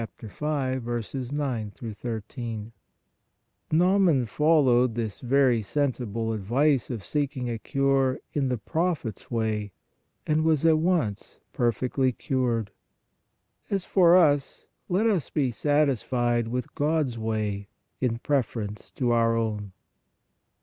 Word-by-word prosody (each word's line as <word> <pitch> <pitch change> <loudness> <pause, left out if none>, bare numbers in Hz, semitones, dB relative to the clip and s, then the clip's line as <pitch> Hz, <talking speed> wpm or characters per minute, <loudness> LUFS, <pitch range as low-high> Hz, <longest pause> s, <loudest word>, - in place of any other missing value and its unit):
9 115 - -3 1.6
13). 115 0 -6 1.0
Naaman 175 -5 +4
followed 130 -3 +3
this 110 -4 -3
very 130 -2 +3
sensible 115 -3 -1
ad 110 - -3
vice 130 +4 +2
of 115 -6 -4
seeking 140 -4 -2
a 115 -2 -3
cure 135 +1 +1 0.2
in 140 -3 0
the 125 - 0
prophet 155 - -2
s - - -17
way, 110 -3 -1 0.5
and 155 0 +2
was 160 -1 +2
at 160 -1 +5
once 155 - -1
perfectly 125 +2 +1
cured. 120 -4 -1 1.0
As 195 -2 -1
for 180 -2 +5
us, 145 -5 +2 0.2
let 190 +5 +2
us 200 -9 +1
be 135 -5 0
satis 145 0 +2
fied 120 -2 0
with 125 +1 -4
God 150 -1 +1
s 115 -1 -7
way 105 -2 -2 0.3
in 120 -3 0
preference 115 -6 -2
to 125 -3 0
our 115 -1 +3
own. 105 -3 -2
125 Hz, 120 wpm, -26 LUFS, 115-145 Hz, 1.6 s, at